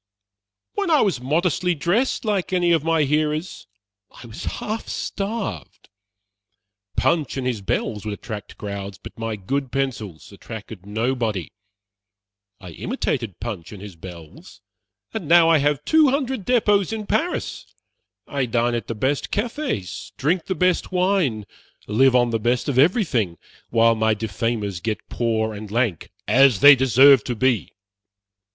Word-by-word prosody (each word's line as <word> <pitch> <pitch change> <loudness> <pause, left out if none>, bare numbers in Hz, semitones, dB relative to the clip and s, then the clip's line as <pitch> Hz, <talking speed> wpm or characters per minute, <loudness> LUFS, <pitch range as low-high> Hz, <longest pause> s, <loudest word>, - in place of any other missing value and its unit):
"When 400 -3 -1
I 310 -3 +5
was 190 - +1
modestly 175 +5 +1
dressed, 200 - 0
like 200 -4 -1
any 175 -2 +2
of 165 -3 +3
my 165 -1 +2
hearers, 150 - -1 0.4
I - - -14
was 110 -2 -8
half 220 +2 -4
starved. 195 - -5 1.1
Punch 155 -5 +1
and 130 - -3
his 120 -5 -2
bells 105 +2 -2
would 105 -1 -4
attract 105 -1 -8
crowds, 100 -1 -6
but - - -12
my 115 -1 -3
good 130 +7 -3
pencils 120 -13 -4
attracted 105 -1 -10
nobody. 110 - -2 1.1
I 90 -4 -10
imitated 120 - -3
Punch 100 -7 -6
and 105 - -9
his 100 -2 -10
bells, 85 -2 -12 0.5
and 160 - -4
now 170 0 +6
I 165 -2 +5
have 145 0 0
two 315 -2 +5
hundred 265 -6 -1
depots 210 -6 +2
in 220 -1 -4
Paris. 345 - -2 0.5
I 135 -3 -2
dine 120 +1 +1
at 115 -3 -3
the 115 - -4
best 135 +6 -1
cafés, 225 - -3
drink 165 +5 0
the 190 - -2
best 180 0 +1
wine, 180 - +1 0.4
live 125 +5 +3
on 120 -1 +3
the 115 - 0
best 120 +3 0
of 135 -3 +1
everything, 135 - +2 0.3
while 115 0 +4
my 110 -1 +1
defamers 105 -3 -3
get 110 +3 -4
poor 110 -2 -1
and 105 0 -8
lank, 110 -6 -1 0.2
as 135 -5 +5
they 145 0 +10
deserve 135 0 +6
to 120 - -2
be. 115 - 0
125 Hz, 145 wpm, -22 LUFS, 110-170 Hz, 1.1 s, they